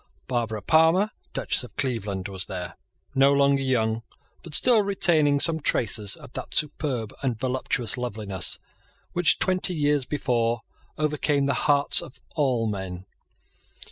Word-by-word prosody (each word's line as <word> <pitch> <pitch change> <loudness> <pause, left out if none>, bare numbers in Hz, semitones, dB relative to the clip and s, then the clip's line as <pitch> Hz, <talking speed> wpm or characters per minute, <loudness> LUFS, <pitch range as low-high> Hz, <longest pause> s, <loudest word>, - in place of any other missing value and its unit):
Barbara 115 -4 -2
Palmer, 165 - +4 0.2
Duchess - - -1
of - - -12
Cleveland, 105 -8 -2
was 95 -2 -3
there, 90 -3 -6 0.4
no 135 +1 +4
longer 140 0 +3
young, 115 -4 0 0.4
but 165 -4 -4
still 240 -4 +5
retaining 160 -8 +2
some 160 +2 +3
traces 105 -7 +2
of - - -14
that - - -7
superb 140 -7 -1
and 125 -5 -1
voluptuous 125 -2 -1
loveliness 105 -6 -1 0.6
which 175 -1 +3
twenty 185 -1 0
years 145 -3 +1
before 120 -5 0 0.4
overcame 150 -2 +1
the 140 - +1 0.2
hearts 145 0 +3
of 155 -6 -12 0.2
all 130 -7 +1
men. 95 -3 -5
130 Hz, 135 wpm, -25 LUFS, 110-150 Hz, 0.6 s, still